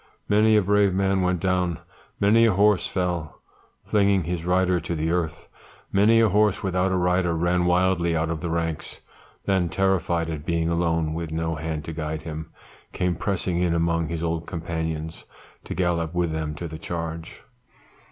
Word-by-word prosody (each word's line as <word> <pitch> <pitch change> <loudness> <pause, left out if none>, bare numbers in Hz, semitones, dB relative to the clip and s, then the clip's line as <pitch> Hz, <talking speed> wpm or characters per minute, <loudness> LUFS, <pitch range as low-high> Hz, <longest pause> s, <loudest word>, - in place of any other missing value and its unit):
Many 110 +1 +4
a 105 - +3
brave 100 -1 +3
man 95 0 +1
went 90 -1 +1
down, 90 -2 0 0.4
many 110 +3 +5
a 110 - +3
horse 105 0 +3
fell, 90 -4 -3 0.5
flinging 100 -3 +2
his 85 0 -3
rider 90 0 +2
to 85 +1 -4
the 80 +1 -1
earth; 85 -2 -2 0.4
many 105 +4 +5
a 115 -1 +4
horse 105 0 +2
without 95 0 +1
a 95 - +1
rider 90 -1 +1
ran 90 +1 +1
wildly 90 -1 +2
out 80 +1 0
of 80 -2 -4
the 85 - -3
ranks; 80 -1 -3 0.4
then 95 -3 +1
terrified 85 -3 +1
at 75 -2 -5
being 85 0 0
alone, 85 -2 0
with 80 -1 -4
no 80 0 -1
hand 80 -1 -4
to 80 - -5
guide 80 0 -4
him, 80 -1 -6 0.4
came 90 -1 0
pressing 90 0 -2
in 90 -2 +1
among 85 -1 +1
his 85 +1 -4
old 85 0 -2
companions, 80 -2 -4 0.4
to - - -5
gallop 85 -2 0
with 85 -2 +1
them 80 -1 -3
to 85 +3 -5
the 80 0 -8
charge. 80 -1 -5
85 Hz, 175 wpm, -24 LUFS, 80-95 Hz, 0.5 s, many